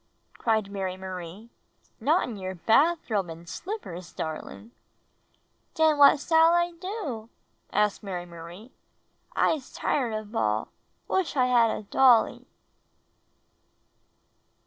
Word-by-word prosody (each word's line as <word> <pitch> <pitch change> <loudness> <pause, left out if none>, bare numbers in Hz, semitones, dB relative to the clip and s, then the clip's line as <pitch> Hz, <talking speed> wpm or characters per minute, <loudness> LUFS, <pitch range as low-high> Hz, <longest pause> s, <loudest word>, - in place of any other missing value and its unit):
cried 220 -2 +1
Mary^ 190 -2 -4
Marie. 190 +3 -8 0.5
''Not 310 +9 +3
in 235 - -5
your 185 -1 -5
bathrobe 225 - +2
and 165 +1 -10
slippers, 185 - -7
darling!" 160 +8 -6 1.0
"Den 315 -2 +4
what 285 0 +7
s'all 325 +3 +4
T - - -19
do?" 345 - -5 0.4
asked 210 0 +1
Mary 185 -4 -5
Marie. 175 +7 -11 0.6
"I'se 295 -5 +1
tired 245 -6 -1
of 215 -1 -5
baU! 110 - 0 0.4
Wish 380 -5 0
I 255 - +4
had 240 -2 +4
a 215 - -3
dolly!" 240 +2 +3
220 Hz, 110 wpm, -27 LUFS, 185-285 Hz, 1.0 s, what